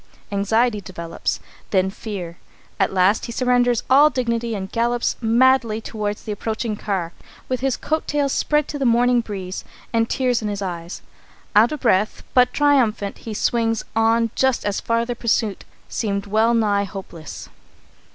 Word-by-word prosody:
Anxiety 210 Hz, +2 st, +1 dB
develops, 170 Hz, -3 st, -4 dB, 0.3 s
then 190 Hz, -1 st, +2 dB
fear. 190 Hz, -5 st, -7 dB, 0.4 s
At -, -, +2 dB
last 190 Hz, +5 st, +2 dB
he -, -, -5 dB
surrenders 245 Hz, -1 st, +2 dB
all 285 Hz, +4 st, +6 dB
dignity 235 Hz, -4 st, -1 dB
and 190 Hz, -1 st, -5 dB
gallops 235 Hz, +1 st, 0 dB
madly 235 Hz, -1 st, +3 dB
toward 210 Hz, -2 st, -3 dB
the 215 Hz, -, -7 dB
approaching 220 Hz, +1 st, -3 dB
car, 190 Hz, -5 st, -3 dB, 0.3 s
with 255 Hz, -1 st, -1 dB
his 265 Hz, 0 st, 0 dB
coat 315 Hz, +1 st, -2 dB
tails 290 Hz, -2 st, 0 dB
spread 300 Hz, +1 st, +1 dB
to 290 Hz, -, -4 dB
the 270 Hz, -, 0 dB
morning 245 Hz, +1 st, +4 dB
breeze 190 Hz, -4 st, -6 dB, 0.3 s
and 225 Hz, 0 st, +2 dB
tears 250 Hz, -3 st, +1 dB
in 215 Hz, -, -2 dB
his 205 Hz, -1 st, -3 dB
eyes. 175 Hz, -3 st, -5 dB, 0.5 s
Out 220 Hz, +3 st, +6 dB
of 300 Hz, -, -4 dB
breath, 210 Hz, -3 st, +1 dB
but 250 Hz, -1 st, +5 dB
triumphant, 250 Hz, -9 st, +2 dB
he 220 Hz, -2 st, -6 dB
swings 225 Hz, 0 st, 0 dB
on 225 Hz, 0 st, +3 dB
just 265 Hz, -2 st, +1 dB
as 205 Hz, -1 st, 0 dB
farther 230 Hz, +1 st, 0 dB
pursuit 225 Hz, -3 st, -1 dB, 0.2 s
seemed 200 Hz, -3 st, -2 dB
well 220 Hz, +3 st, +2 dB
nigh 205 Hz, -3 st, +2 dB
hopeless. 185 Hz, -5 st, -9 dB
225 Hz, 155 wpm, -21 LUFS, 200-245 Hz, 0.5 s, all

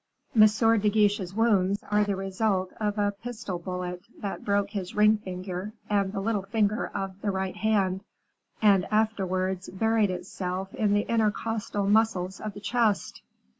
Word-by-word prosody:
"M. 215 Hz, -1 st, +9 dB, 0.3 s
de 210 Hz, +1 st, +2 dB
Guiche's 205 Hz, -3 st, +1 dB
wounds 205 Hz, -3 st, +2 dB
are 210 Hz, 0 st, +4 dB
the 205 Hz, -1 st, -1 dB
result 195 Hz, 0 st, -1 dB
of 210 Hz, -1 st, -1 dB
a 205 Hz, -1 st, +2 dB
pistol 210 Hz, -3 st, -6 dB
bullet 180 Hz, 0 st, -5 dB, 0.2 s
that 200 Hz, -, -5 dB
broke 200 Hz, 0 st, +1 dB
his 190 Hz, -4 st, -5 dB
ring 210 Hz, +1 st, +5 dB
finger 185 Hz, +1 st, -5 dB, 0.2 s
and 200 Hz, -2 st, +2 dB
the 195 Hz, -, -3 dB
little 205 Hz, 0 st, 0 dB
finger 210 Hz, +2 st, 0 dB
of 195 Hz, 0 st, -4 dB
the 210 Hz, -, -1 dB
right 190 Hz, -1 st, -2 dB
hand, 195 Hz, -3 st, +1 dB, 0.6 s
and 200 Hz, -3 st, +5 dB
afterwards 190 Hz, -4 st, 0 dB
buried 220 Hz, +1 st, +2 dB
itself 185 Hz, +1 st, -4 dB
in 205 Hz, -1 st, +1 dB
the 205 Hz, -, 0 dB
intercostal 220 Hz, -2 st, 0 dB
muscles 200 Hz, -3 st, +2 dB
of 215 Hz, -1 st, -6 dB
the -, -, -7 dB
chest." 215 Hz, -1 st, 0 dB
200 Hz, 155 wpm, -27 LUFS, 190-215 Hz, 0.6 s, M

